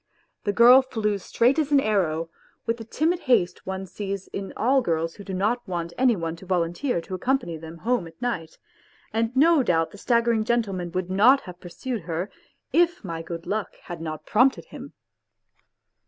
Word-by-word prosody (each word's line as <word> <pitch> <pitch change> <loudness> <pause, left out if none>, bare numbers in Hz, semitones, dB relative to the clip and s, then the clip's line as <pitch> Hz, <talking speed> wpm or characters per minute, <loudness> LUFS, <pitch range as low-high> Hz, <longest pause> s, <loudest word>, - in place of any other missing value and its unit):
The 205 - +2
girl 240 +5 +8
flew 215 -6 -2
straight 245 - +2
as 300 -1 0
an 285 - +6
arrow, 165 -9 0 0.3
with 230 0 0
the 225 - -7
timid 320 +9 0
haste 185 - +1
one 190 0 -3
sees 195 0 -5
in 195 0 -5
all 265 +3 +3
girls 165 -5 -1
who 205 - -11
do 195 - -7
not 215 +6 +1
want 170 -2 -4
any 250 -2 +3
one 165 -3 -3
to 190 - -13
volunteer 175 +5 0
to 185 - -9
accompany 250 -3 -1
them 160 +1 -9
home 230 -1 0
at 165 0 -16
night, 205 -10 -3 0.6
and 225 +1 +1
no 320 +1 +6
doubt 165 -8 +1
the 205 - -12
staggering 235 -1 +2
gentleman 200 -7 -1
would 185 0 -2
not 240 +8 +5
have 180 -1 -11
pursued 225 +6 -5
her, 170 +4 -4 0.4
if 345 -3 +3
my 165 -4 -5
good 165 0 -7
luck 215 0 -3
had 175 -2 -7
not 155 -1 -6
prompted 255 +5 +3
him. - - -10
200 Hz, 185 wpm, -25 LUFS, 170-245 Hz, 0.6 s, girl